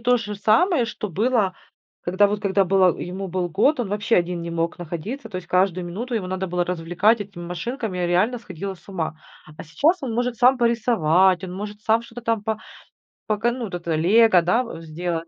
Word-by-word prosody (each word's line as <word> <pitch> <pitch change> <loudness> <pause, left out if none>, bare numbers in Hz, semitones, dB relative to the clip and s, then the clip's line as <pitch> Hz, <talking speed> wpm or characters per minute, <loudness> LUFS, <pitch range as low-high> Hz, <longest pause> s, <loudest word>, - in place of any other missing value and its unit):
то 245 +1 +3
же 210 -3 -5
самое, 260 - +3
что 225 -2 -5
было, 210 +1 +1 0.5
когда 185 +4 +3
вот, 205 0 -2
когда 195 0 +2
было 185 -1 +3
ему, 190 +2 -5
был 180 0 -2
год, 240 - +2
он 240 -5 -2
вообще 210 +3 +1
один 175 -1 0
не 170 - -5
мог 165 +1 -2
находиться. 190 - -6
То 190 - -6
есть 180 -1 -7
каждую 185 -1 +1
минуту 230 +8 -5
его 210 -5 -1
надо 185 +1 -3
было 175 0 0
развлекать 180 +6 +1
этими 195 -4 -7
машинками, 190 - -4
я 175 - 0
реально 200 +8 +2
сходила 195 -2 -6
с 185 - -22
ума. 170 -5 -3 0.4
А - - -8
сейчас 300 - +1
он 255 -4 -3
может 245 +1 -1
сам 250 +2 +4
порисовать, 190 -6 +3
он 180 - -6
может 205 +2 -7
сам 225 +1 +2
что-то 235 +1 -10
там 230 -2 0
по 220 0 -2 0.7
пока 220 +2 +1
ну, 245 -1 -4
вот 195 - -9
это 170 -2 -2
лего, 190 +4 +5
да, 225 +9 +2
у 230 -9 -8
сделать. 165 +1 -4
195 Hz, 210 wpm, -23 LUFS, 175-230 Hz, 0.7 s, лего